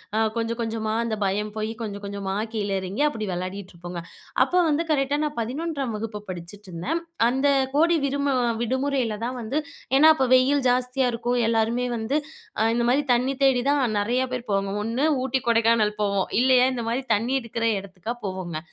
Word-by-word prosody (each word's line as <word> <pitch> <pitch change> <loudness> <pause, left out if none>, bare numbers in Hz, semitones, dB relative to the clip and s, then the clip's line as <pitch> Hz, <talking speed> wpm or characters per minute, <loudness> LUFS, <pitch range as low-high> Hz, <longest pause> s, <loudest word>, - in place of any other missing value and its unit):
அ - - +1 0.2
கொஞ்சம் 230 +1 -2
கொஞ்சமா 220 -1 -2
அந்த 225 -2 -1
பயம் 210 +2 -1
போய் 215 +1 -2
கொஞ்சம் 205 -2 -5
கொஞ்சமா 200 -1 -4 0.2
கீழ 205 -2 -2
இறங்கி, 190 +8 -4
அப்படி 225 -7 -3
வெளையாடிட்டுருப்போங்க. 180 -1 -6 0.4
அப்போ 360 +7 0
வந்து 310 +3 +1
கரெக்ட்‌டா 280 0 +1
நான் 300 -3 -3
11ஆம் 270 +1 -3
வகுப்பு 210 -1 -5
படிச்சுட்ருந்தேன். 185 - -5 0.3
அந்த 265 +3 +1 0.3
கோடை 335 +3 +4
விடுமு 280 0 0 0.3
விடுமுறையில 260 -2 0
தான் 250 +1 -3
வந்து 270 +7 -1 0.4
ஏன்னா 310 +3 +8
அப்ப 265 -3 +1
வெயில் 265 +1 +3
ஜாஸ்தியா 250 +1 +1
இருக்கும். 240 +1 -1
எல்லாருமே 230 +2 +1
வந்து 230 +7 0 0.4
அ - - +3
இந்த 235 0 +1
மாரி 285 +3 +2
தண்ணி 255 +3 +1
தேடி 255 -2 +4
தான் 285 -2 +3 0.2
நெறையா 245 +5 0
பேர் 245 -3 -5
போவாங்க. 195 0 0
ஒண்ணு 240 +7 0 0.2
ஊட்டி, 265 0 0
கொடைக்கானல் 225 -2 +3
போவோம். 200 -2 +1
இல்லையா, 255 0 +5
இந்த 235 - -3
மாரி 250 +3 -1
தண்ணி 235 +5 -1
இருக்கிற 230 0 -3
இடத்துக்கா 195 +4 -6
போவோம்ங்க. 185 -4 -4
230 Hz, 165 wpm, -24 LUFS, 210-265 Hz, 0.4 s, ஏன்னா